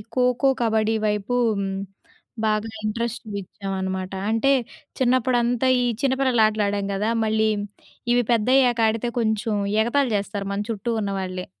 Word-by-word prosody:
ఖోఖో, 250 +1 +2
కబడ్డీ 220 -1 +2
వైపు 210 +3 -1 1.1
బాగా 215 +1 0
ఇంట్రెస్ట్ 230 +2 -2
చూయిచాం 195 0 -5
అనమాట. 190 0 -3 0.2
అంటే 225 +5 +2 0.5
చిన్నప్పుడంతా 245 -1 +2
ఈ - - +1 0.2
చిన్న 270 -1 +2
పిల్లలటలు 220 -5 +3
ఆడాం 200 0 -1
గదా! 210 +3 0
మళ్ళీ 220 0 +2 0.6
ఇవి 245 0 +3
పెద్దయ్యాక 245 +1 +3
ఆడితే 225 +2 -1
కొంచెం 220 0 0 0.3
ఎగతాళి 255 +2 +1
జాస్తారు 200 0 -4
మన 205 +1 -2
చుట్టూ 225 +2 -2
ఉన్న 200 -1 -2
వాళ్ళే. 185 -1 -5
220 Hz, 130 wpm, -23 LUFS, 205-245 Hz, 1.1 s, పిల్లలటలు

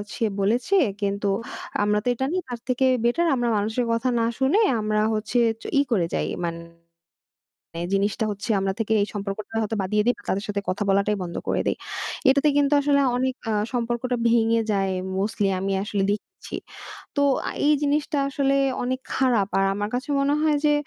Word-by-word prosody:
সে 230 - 0
বলেছে 235 - +1 0.3
কিন্তু 200 0 -1 0.6
আমরা 210 0 +2
তো - - -6
এটা 265 +2 -2
নেই 370 - 0
তার 245 -2 -5
থেকে 255 +1 +1 0.2
বেটার 335 +9 +2
আমরা 240 -2 0
মানুষের 220 +4 0
কথা 230 +3 0
না 230 - +2 0.2
শুনে 275 +11 +3 0.2
আমরা 215 0 0
হচ্ছে 220 +3 -1 0.4
ই - - +6
করে 190 -7 +2
যাই - - 0 0.2
মানে 170 0 -4 1.3
জিনিসটা 200 +2 +1
হচ্ছে 205 +3 -6
আমরা 195 0 0
থেকে 220 0 0
এই 205 - 0
সম্পর্কটা 205 +1 -5
হয়তো 220 0 -2
বাদ 185 - -3
দিয়ে 210 0 +3
দেই 245 - +4
বা - - -16
তাদের 200 +2 0
সাথে 205 -1 -2
কথা 190 +3 -1
বলাটাই 200 +1 +2
বন্ধ 170 -1 -6
করে - - +1
দেই। - - +1 0.5
এটাতে 280 +3 +4
কিন্তু 285 0 +3
আসলে 280 0 +3 0.2
অনেক 260 +1 0 0.2
আ - - +1 0.2
সম্পর্কটা 240 +1 -1
ভেঙে 230 0 +3
যায় 195 -1 +1 0.3
মোস্টলি 205 0 0
আমি 195 +1 -2
আসলে 205 -1 -1
দেখছি। 215 - -6 0.6
তো 285 - +2 0.5
এই 300 - +5
জিনিসটা 290 0 0
আসলে 275 0 +1 0.3
অনেক 255 +1 -2
খারাপ। 240 -7 +2
আর 195 - +3
আমার 205 +1 -2
কাছে 250 +2 -3
মনে 285 +1 +2
হয় 305 -2 +3
যে 295 - +4
230 Hz, 180 wpm, -24 LUFS, 205-260 Hz, 1.3 s, ই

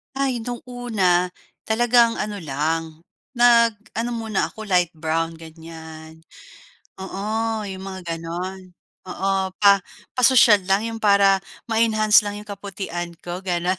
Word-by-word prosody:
Ay, 265 -3 0
no'ng 240 +1 -6
una, 210 -8 +1 0.4
talagang 235 +1 +3
ano 210 -1 -4
lang, 160 +2 -3 0.3
nag-ano 235 -1 +2
muna 220 -3 -1
ako 220 - -10
light 180 -4 +2
brown, 165 +1 -2
ganyan. 160 0 -12 0.8
Oo, 215 +3 -3
yung 190 -1 -7
mga 175 -4 -5
gano'n. 180 +2 -6 0.3
Oo, 190 0 -1
pa 200 -1 +7 0.4
pasosyal 230 -6 +5
lang 195 +2 +2
yung 225 - -6
para 200 -2 +4 0.3
ma-enhance 220 -1 +4
lang 205 - -3
yung 210 - -13
kaputian 190 -4 -6
ko, 175 0 -5
gano'n. 180 +1 0
195 Hz, 120 wpm, -22 LUFS, 175-220 Hz, 0.8 s, pa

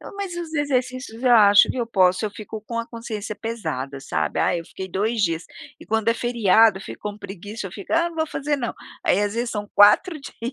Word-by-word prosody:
Não, - - -11
mas 390 -3 -4
os 340 -2 -6
exercícios 255 -4 -2
eu 250 -2 +4
acho 205 -2 +7
que - - -5
eu 240 -2 -1
posso, 185 -3 +3
eu 210 - -1
fico 215 +1 -8
com 230 +2 -5
a 230 - -3
consciência 220 -3 -6
pesada 160 - -4
sabe, - - -2
ah, 180 - +2
eu 165 - -5
fiquei 190 +3 -8
2 215 +4 -1
dias, 165 -3 0 0.4
e - - -11
quando 225 0 0
é 230 - +4
feriado, 225 -3 +4
eu - - -10
fico - - -9
com 205 - -12
preguiça, 205 +2 -7
eu 180 - -10
fico: 200 - -8
"Ah, 335 +1 +3
não 335 - -12
vou 315 - 0
fazer 295 -1 -2
não." 245 -4 -3 0.3
Aí, 195 - +3
às 205 0 -1
vezes, 235 0 -2
são 210 -1 -4
4 305 - +5
dias. 245 -2 -7
225 Hz, 240 wpm, -23 LUFS, 200-245 Hz, 0.4 s, acho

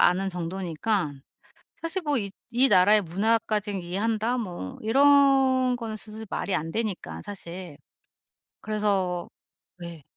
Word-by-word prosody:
아는 190 +2 +3
정도니까 180 0 -2 0.7
사실 330 +3 -2
뭐 295 -4 0
이 200 -4 -3 0.2
이 250 +3 +5
나라의 205 +4 +6
문화까지는 210 +2 0
이해한다 220 +7 -1
뭐 175 - -5
이런 270 0 +4
거는 225 -2 -5
사실 215 +1 -8
말이 200 - -2
안 165 +1 -3
되니까 215 -3 -3
사실. 180 -5 -8 0.8
그래서 195 -5 -1 0.5
왜 170 -3 -9
210 Hz, 250 characters per minute, -26 LUFS, 180-230 Hz, 0.8 s, 나라의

